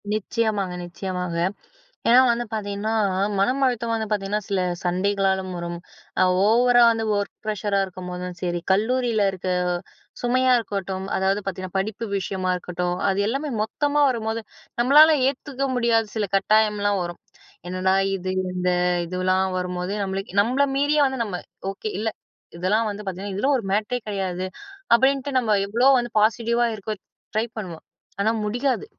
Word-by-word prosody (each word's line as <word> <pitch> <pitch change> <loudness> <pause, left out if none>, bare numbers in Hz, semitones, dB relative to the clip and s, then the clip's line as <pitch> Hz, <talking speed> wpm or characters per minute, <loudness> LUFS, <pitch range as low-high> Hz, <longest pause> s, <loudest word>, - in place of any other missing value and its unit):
நிச்சயமாங்க, 215 -3 -1
நிச்சயமாக. 180 -1 -4 0.7
ஏன்னா 245 +2 +7
வந்து 240 0 +1
பார்த்திங்கன்னா, 210 0 -2 0.5
மனம் 255 +8 +1
அழுத்தம் 235 -2 0
வந்து 220 -1 -1
பார்த்திங்கனா 205 0 0
சில 195 -2 +1 0.2
சண்டைகளாலும் 190 +1 0
வரும். 170 0 -4 0.7
ஓவரா 240 +3 +5
வந்து 225 -1 -1
ஒர்க் 200 0 -3
ப்ரஷரா 205 -1 0
இருக்கும்போதும் 180 -1 -7
சரி. 175 -1 -1
கல்லூரியில 225 +1 +2
இருக்க 185 -1 -5 0.7
சுமையா 255 +1 +3
இருக்கட்டும், 195 -3 -4
அதாவது 195 +2 +1
பார்த்திங்கன்னா, 185 -1 -5
படிப்பு 215 +3 -3
விஷயமா 190 -1 -2
இருக்கட்டும். 180 0 -3
அது 195 0 0
எல்லாமே 275 +6 -2
மொத்தமா 290 +6 0
வரும்போது, 225 -2 -2 0.4
நம்மளால 300 +5 +7
ஏத்துக்க 275 0 -2
முடியாத 230 -2 +2
சில 210 -2 0
கட்டாயம்லாம் 205 0 +2
வரும். 175 0 -6 0.5
என்னடா 185 +1 +1 0.2
இது 185 -1 -4 0.2
இந்த 180 0 -1 0.4
இதுவலாம் 185 +2 0
வரும்போது 180 +1 -3
நம்மளுக்கு 195 -1 -4
நம்மள 250 +7 +3
மீறியே 290 +2 +2
வந்து 265 -1 -1
நம்ம 200 -5 -4 0.3
ஓகே 195 +2 -5
இல்லை. 220 +2 -1 0.5
இதெல்லாம் 210 +6 +1
வந்து 205 0 -5
பார்த்திங்கன்னா, 190 +1 -5
இதில் 270 +9 +2
ஒரு 235 - -5
மேட்டரே 215 +5 0
கிடையாது 190 -3 -2 0.5
அப்படின்ட்டு 265 +2 +3
நம்ம 220 -4 +2
எவ்வளோ 240 +6 +3
வந்து 240 -1 -2
பாசிட்டிவா 235 +2 +2
இருக்க 215 +1 -5 0.4
ட்ரை 220 +1 +1
பண்ணுவோம். 180 -6 -7 0.4
ஆனா 220 +2 +3
முடியாது. 250 - -1
205 Hz, 135 wpm, -23 LUFS, 190-235 Hz, 0.7 s, ஏன்னா